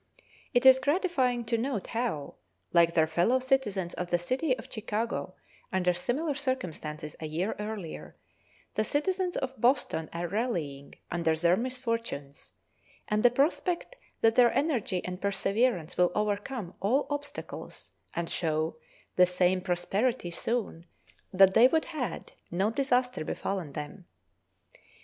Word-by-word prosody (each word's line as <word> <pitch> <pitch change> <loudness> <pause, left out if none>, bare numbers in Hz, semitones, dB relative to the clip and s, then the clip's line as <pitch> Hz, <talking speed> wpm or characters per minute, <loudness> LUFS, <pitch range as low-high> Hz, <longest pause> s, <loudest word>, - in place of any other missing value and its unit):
It 245 -1 +2
is 260 0 +9
gratifying 265 -5 +1
to 230 0 0
note 235 -5 -2
how, 225 -12 -2 0.4
like 170 -1 +5
their 160 -2 +5
fellow 175 +10 +2
citizens 250 -9 0
of 180 - -3
the 175 - +2
city 255 - 0
of - - -10
Chicago 215 -3 -3 0.4
under 180 -1 +2
similar 270 - -1
circumstances 170 - -4
a 155 - -4
year 170 +7 -2
earlier, 210 -5 -6 0.6
the 215 - +1
citizens 360 - 0
of 260 -3 -4
Boston 240 - +2
are 170 +1 -3
rallying 170 - -3 0.2
under 165 -2 +1
their 170 +2 +3
misfortunes, 230 - -4 0.6
and 210 0 +2
the 245 - +7
prospect 335 - 0 0.3
that 225 0 +5
their 245 -1 +6
energy 245 - 0
and 180 0 -5
perseverance 200 -2 +1
will 180 -1 +4
overcome 210 -1 -2
all 240 +9 +2
obstacles 290 0 -6 0.2
and 170 -1 -1
show 155 -1 0 0.4
the 180 0 +7
same 180 +1 +2
prosperity 190 +4 0
soon 195 -4 -2 0.4
that 190 0 +6
they 235 +5 +8
would 320 +4 +1
had 300 -7 -5 0.2
no 190 +5 +1
disaster 250 - +1
befallen 175 -2 -3
them. 150 +5 -7
210 Hz, 135 wpm, -29 LUFS, 175-255 Hz, 0.6 s, is